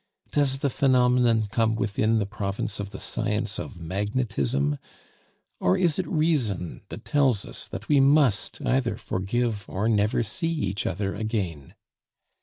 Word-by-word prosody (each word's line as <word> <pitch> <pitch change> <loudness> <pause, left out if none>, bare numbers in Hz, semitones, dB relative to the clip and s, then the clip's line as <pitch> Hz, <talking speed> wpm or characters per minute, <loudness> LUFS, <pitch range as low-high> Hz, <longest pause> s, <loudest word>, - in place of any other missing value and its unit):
Does 140 -2 +2
the 140 0 -1
phenomenon 125 -4 +3
come 110 -1 +2
within 110 +1 +1
the 105 - +1
province 100 -1 -3
of 100 -1 -4
the - - -9
science 110 -3 -1
of 90 - -7
magnetism? 90 - -1 0.8
Or 90 +1 +3
is 170 -2 +2
it 185 - -1
reason 135 - 0
that - - -8
tells 135 -8 +2
us - - -7
that - - -7
we 145 -2 +4
must 135 -6 +3
either 125 -5 +1
forgive 105 +3 -1
or 100 +4 -1
never 105 0 +2
see 165 - -1
each 100 - -2
other 95 +1 -2
again? 100 - -3
110 Hz, 145 wpm, -26 LUFS, 100-130 Hz, 0.8 s, we